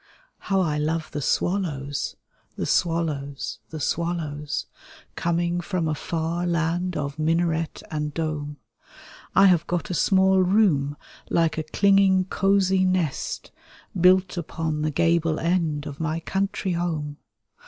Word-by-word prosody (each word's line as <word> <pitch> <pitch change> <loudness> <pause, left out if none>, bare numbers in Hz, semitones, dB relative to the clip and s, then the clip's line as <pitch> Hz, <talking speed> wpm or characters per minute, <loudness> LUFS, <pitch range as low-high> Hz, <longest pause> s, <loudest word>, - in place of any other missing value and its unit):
How 195 -1 +1
I 150 -4 0
love 155 +1 -1
the 145 - -3
swallows, 145 -4 -1 0.4
the - - -3
swallows, 145 -8 -1
the 160 - -6
swallows. 155 -2 -2 0.5
Coming 170 +1 0
from 175 -2 -2
a 155 - 0
far 165 +3 -2
land 170 +1 0
of 140 +1 -4
minaret 165 0 0
and 150 -1 -2
dome. 150 -2 -3 0.8
I 195 - +7
have 175 -4 +4
got 175 +3 -2
a - - -1
small 190 +2 +4
room, 180 -7 +3 0.3
like 165 -1 +1
a - - -2
clinging 195 -1 +4
cosy 190 0 +2
nest. 185 -6 -1 0.4
Built 185 +1 +4
upon 160 -2 -3
the 155 - +1
gable 165 0 +1
end 165 -4 0
of 145 0 -7
my 160 0 -1
country 195 +2 -2
home. 160 -4 -2
165 Hz, 130 wpm, -24 LUFS, 150-185 Hz, 0.8 s, I